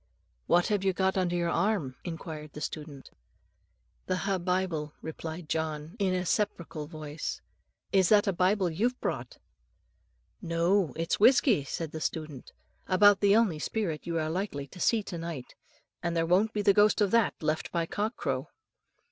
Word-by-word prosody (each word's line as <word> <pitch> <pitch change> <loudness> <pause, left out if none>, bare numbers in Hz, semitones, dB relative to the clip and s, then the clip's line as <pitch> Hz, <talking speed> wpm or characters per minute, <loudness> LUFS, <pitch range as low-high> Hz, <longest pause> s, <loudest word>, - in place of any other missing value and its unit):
"What 175 0 +3
have 205 -2 +1
you 190 -1 +2
got 190 +1 +1
under 180 -2 +1
your 170 -1 0
arm?" 190 -12 0
inquired 160 -3 -7
the - - -7
student. 150 -2 -7 1.0
"The 185 - 0
ha' 195 0 -1
Bible," 175 -4 -1
replied 160 +1 -6
John, 155 +2 -3
in 190 -2 +1
a 180 0 -1
sepulchral 170 -6 -2
voice; 155 -1 -5 0.5
"is 190 -3 +4
that 210 0 +5
a 195 - +1
Bible 185 +2 +2
you've 235 +10 0
brought?" - - -4 1.0
"No, 170 -1 +1
it's 165 +2 -1
whisky," 245 - +5
said 160 +2 -4
the 160 - -6
student, 155 -5 -4 0.4
"about 200 +1 +6
the 200 0 +4
only 210 -9 +3
spirit 170 -5 -3
you 170 -1 -1
are 155 -1 -1
likely 170 -6 -3
to 185 - -12
see 220 +3 +2
to 175 -4 -6
night; 165 -6 -6 0.5
and 170 -1 -1
there 165 - +2
won't 190 +6 +3
be 210 -2 -2
the 200 - +5
ghost 210 +2 +4
of 205 -3 +2
that 230 -3 +3
left 155 0 -2
by 170 -1 0
cock 210 +7 -2
crow." - - -2
175 Hz, 170 wpm, -29 LUFS, 160-200 Hz, 1.0 s, about